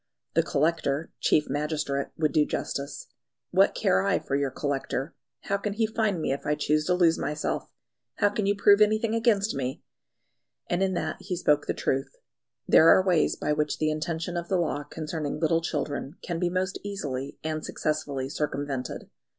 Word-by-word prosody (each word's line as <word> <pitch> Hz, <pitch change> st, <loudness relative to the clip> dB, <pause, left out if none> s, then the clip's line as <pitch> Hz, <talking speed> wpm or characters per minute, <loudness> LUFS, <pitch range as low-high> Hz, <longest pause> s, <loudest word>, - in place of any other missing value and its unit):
The -, -, +4 dB
Collector 155 Hz, 0 st, 0 dB
(chief 150 Hz, -, +3 dB
magistrate) 145 Hz, -2 st, -1 dB
would 155 Hz, -2 st, +1 dB
do 150 Hz, -, +4 dB
justice. 140 Hz, -1 st, -4 dB, 0.5 s
"What -, -, +4 dB
care 95 Hz, -, +3 dB
I 100 Hz, -, +2 dB
for 135 Hz, -, -3 dB
your 140 Hz, -1 st, +1 dB
Collector? 135 Hz, +1 st, -3 dB, 0.3 s
How 200 Hz, -, -1 dB
can 200 Hz, 0 st, -3 dB
he 220 Hz, +2 st, +1 dB
find 220 Hz, -4 st, 0 dB
me 155 Hz, -, -1 dB
if 140 Hz, -, -5 dB
I 150 Hz, -, +1 dB
choose 150 Hz, +1 st, +1 dB
to 180 Hz, -, +2 dB
lose 170 Hz, -2 st, +3 dB
myself? 150 Hz, +1 st, -2 dB, 0.5 s
How 205 Hz, -, +3 dB
can 205 Hz, -1 st, -1 dB
you 200 Hz, -, +3 dB
prove 200 Hz, +1 st, +5 dB
anything 215 Hz, +1 st, +3 dB
against 225 Hz, -3 st, +2 dB
me?" 130 Hz, -1 st, -3 dB, 0.8 s
And 175 Hz, +1 st, 0 dB
in 190 Hz, -1 st, +1 dB
that -, -, -2 dB
he 185 Hz, -1 st, -4 dB
spoke 150 Hz, -4 st, +2 dB
the -, -, -1 dB
truth. 135 Hz, 0 st, -1 dB, 0.5 s
There 160 Hz, -, +7 dB
are 185 Hz, -, +6 dB
ways 175 Hz, -5 st, +3 dB
by 150 Hz, -, -1 dB
which 150 Hz, 0 st, 0 dB
the 155 Hz, 0 st, +1 dB
intention 165 Hz, +2 st, -3 dB
of 170 Hz, 0 st, -3 dB
the 190 Hz, -, +2 dB
law 150 Hz, -4 st, -1 dB
concerning 150 Hz, -1 st, -4 dB
little 165 Hz, +1 st, +2 dB
children 145 Hz, -2 st, -3 dB
can 170 Hz, -2 st, -3 dB
be 175 Hz, 0 st, +1 dB
most 185 Hz, +2 st, -1 dB
easily 145 Hz, -10 st, -4 dB
and 155 Hz, 0 st, -2 dB
successfully 145 Hz, -3 st, -2 dB
circumvented. 140 Hz, -2 st, -3 dB
155 Hz, 180 wpm, -27 LUFS, 145-185 Hz, 0.8 s, There